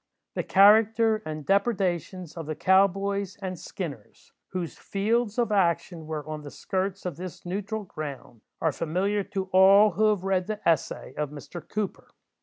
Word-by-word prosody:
The - - -1
character 220 +2 +5
and 155 -1 -5
depredations 185 - 0
of 165 -3 -6
the 155 - -3
"cow 190 +4 +5
boys" 200 0 -3
and 185 -3 -5
"skinners," 145 - -8
whose 180 -3 -4
fields 215 +2 -1
of 235 -3 +1
action 170 -4 +1
were 155 -2 -5
on 155 -1 -5
the 145 - -8
skirts 190 +5 -3
of 175 -5 -4
this 180 0 -8
neutral 205 +4 -3
ground, 140 - -8 0.2
are 160 - +1
familiar 185 +7 -1
to 195 -1 -3
all 195 +3 +7
who 215 +4 +1
have 205 -4 0
read 190 -2 0
"the 215 -1 -3
Essay" 160 -4 0
of 150 -2 -1
Mr. 150 +4 -9
Cooper. 210 -2 -4
190 Hz, 165 wpm, -27 LUFS, 165-205 Hz, 0.2 s, all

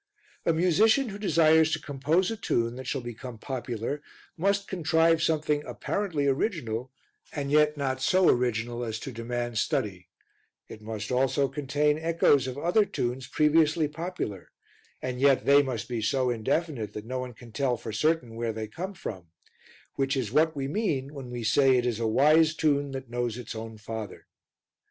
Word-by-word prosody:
A - - +5
musician 210 - +3
who 200 0 -7
desires 160 -4 +4
to - - 0
compose 155 +8 0
a - - -2
tune 115 - -1
that 130 -1 -7
shall 135 - -2
become 120 0 -8
popular 125 +2 -4 0.3
must 200 +3 0
contrive 165 -2 +2
something 150 -2 +1
apparently 175 -7 -2
original 130 - -1 0.4
and 140 -2 -3
yet 150 0 +4
not 130 -2 -2
so 185 +6 +3
original 120 -1 +1
as 110 -2 -3
to 135 - -6
demand 120 0 -3
study; 95 -5 -2 0.6
it 110 - -11
must 110 0 -5
also 135 +2 +2
contain 145 +2 0
echoes 160 -5 +3
of 130 +1 -5
other 175 +8 +3
tunes 130 -9 -3
previously 155 +2 +3
popular, 150 - -5 0.5
and 125 -1 -3
yet 140 -1 +4
they 140 +1 +7
must 120 -4 -4
be 120 -3 -3
so 125 +3 +1
indefinite 120 - -2
that 105 - -7
no 130 +2 -3
one 125 -2 -6
can 120 0 -14
tell 125 +1 0
for 110 - -7
certain 125 +1 0
where 115 0 -2
they 110 0 -5
come 185 - -6
from, 95 - -7 0.7
which 135 0 0
is 120 -5 -2
what 160 +3 +3
we 135 -1 -2
mean 145 -6 -1
when 135 -4 -8
we 120 -1 -5
say 130 +4 +4
it 125 - 0
is 120 -3 -1
a 115 - 0
wise 155 +7 +4
tune 145 -2 +1
that 135 -1 -6
knows 120 -1 -2
its 125 -3 -7
own 110 0 -7
father. 110 -1 -7
135 Hz, 175 wpm, -27 LUFS, 120-155 Hz, 0.7 s, they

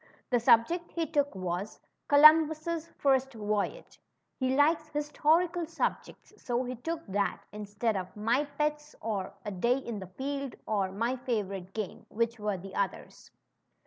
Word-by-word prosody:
The 245 - +4
subject 240 +10 +4
he 335 -1 0
took 285 -5 0
was 185 +2 -4 0.3
Co 285 - +3
lumbus' 315 +2 +5
First 270 -2 +2
Voyage." 210 - -3 0.4
He 260 0 +1
likes 310 +2 +3
historical 320 +4 +1
subjects, 335 - -3
so 245 0 -1
he 250 0 -4
took 330 +6 -4
that 200 +1 -1
instead 210 +2 -2
of 185 -1 -4
^^My 235 +7 +1
Pets," 300 0 -1
or 205 -4 -3
K 210 - -3
Day 235 +7 +2
in 235 -5 -5
the 190 - -8
Field," 275 +7 -4
or 200 -3 0
My 230 +6 -1
Favorite 200 -7 -3
Game," 215 -4 -5
which 230 +1 -1
were 210 -2 -1
the 190 +2 -10
others. 200 -1 -4
245 Hz, 150 wpm, -30 LUFS, 205-300 Hz, 0.4 s, lumbus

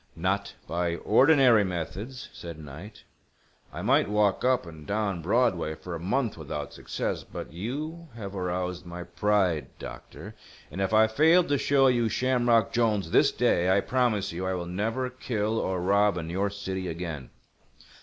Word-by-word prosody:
"Not 95 +4 -1
by 85 0 -1
ordinary 125 - +5
methods," 95 +7 -5
said 85 -2 -8
Knight. 80 +8 -11 0.7
"I - - -6
might 100 - +3
walk 105 -2 +2
up 125 -5 +2
and 80 -3 -11
down 100 -4 -1
Broadway 90 -5 +1
for 90 +2 -8
a 85 - -4
month 105 +3 -1
without 75 -1 -5
success. - - -3
But - - -8
you 150 - -5
have 100 -3 -7
aroused 90 -1 -3
my 85 0 -7
pride, 90 -5 +1
doctor; - - -9 0.4
and 95 - -4
if 95 - 0
I 110 0 +6
fail 160 +11 +4
to 145 - 0
show 135 -1 +3
you 120 -3 +3
Shamrock 120 -2 +2
Jolnes 105 -7 +1
this - - +5
day, 90 +1 +2
I 95 +1 +4
promise 120 -6 0
you 85 +2 -5
I 95 - 0
will 90 -1 -4
never 110 +8 -2
kill 115 -3 -2
or 95 -1 -1
rob 100 +2 +3
in 85 -1 -4
your 100 +3 0
city 95 -2 -4
again." 80 -7 -5
100 Hz, 165 wpm, -27 LUFS, 90-115 Hz, 0.7 s, I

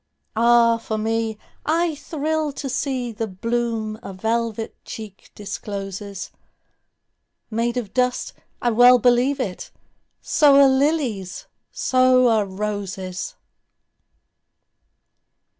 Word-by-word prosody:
Ah, 230 0 +4
for 220 -1 -4
me, 225 0 -1 0.3
I 330 +1 +1
thrill 310 +1 -2
to 275 - -5
seeThe 245 -7 -3
bloom 230 -2 -2
a 195 - -8
velvet 225 +2 -2
cheek 215 -3 -9
discloses, 200 -1 -6 1.2
Made 235 +2 -1
of 220 -5 -4
dust—I 250 -1 -2
well 245 +2 +7
believe 245 +4 +3
it! 195 -8 -4 0.5
So 290 -3 +4
are 280 - +8
lilies, 265 - 0 0.3
so 255 -1 +3
are 215 -3 +2
roses! 195 - -4
230 Hz, 90 wpm, -22 LUFS, 210-255 Hz, 1.2 s, are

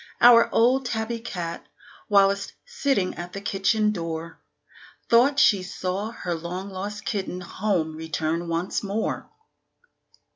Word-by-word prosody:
Our 235 -1 +7
old 250 +3 +3
Tabby 230 0 -2
cat, 175 -8 -5 0.4
whilst 200 -1 +3
sitting 275 - 0
at 175 +1 -7
the 200 - -4
kitchen 210 +2 +1
door, 165 -3 -5 0.7
Thought 255 +5 +5
she 210 -9 +5
saw 185 +3 -3
her 180 -6 -4
long 180 +4 -5
lost 205 +2 -6
kitten 190 -4 -3
home 180 -4 -1
returned 160 +1 -2
once 170 +2 -1
more. 205 +2 -3
195 Hz, 120 wpm, -25 LUFS, 175-220 Hz, 0.7 s, Our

